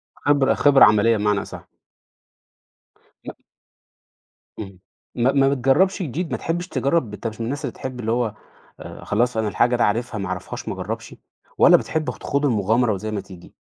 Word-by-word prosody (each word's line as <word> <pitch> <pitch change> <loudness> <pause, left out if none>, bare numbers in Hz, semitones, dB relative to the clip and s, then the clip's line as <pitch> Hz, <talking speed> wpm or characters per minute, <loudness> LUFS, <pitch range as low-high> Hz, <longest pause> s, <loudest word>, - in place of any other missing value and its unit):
خبرة 145 -2 +2
خبرة 145 -2 +6
عملية 110 +2 +3
بمعنى 105 -1 0
أصح. - - -10 1.6
م - - -7 1.3
اهم، 95 -3 -8 0.4
ما 125 +3 +2
ما 135 -1 +3
بتجربش 140 +10 +2
جديد، 160 +4 -4
ما - - -1
تحبش 175 +2 -3
تجرب، 140 - -1
أنت 105 +3 -5
مش 110 0 -8
من - - -2
الناس 140 +4 -4
اللي 125 - -4
تحب 130 -1 -7
اللي 115 -1 -2
هو 115 -3 -1 0.7
خلاص 120 +3 0
أنا 110 - 0
الحاجة 120 +4 +1
ده 120 - +1
عارفها 115 +2 -1
ما 100 -2 -4
أعرفهاش 95 0 -6
ما - - -2
أجربش - - -6 0.4
والّا - - +7
بتحب 155 -1 -3
خ - - -13
تخوض 140 +1 -2
المغامرة 115 -1 +1
وزي 110 +3 -5
ما 105 -2 -3
تيجي؟ 95 -3 -14
120 Hz, 170 wpm, -22 LUFS, 105-140 Hz, 1.6 s, والّا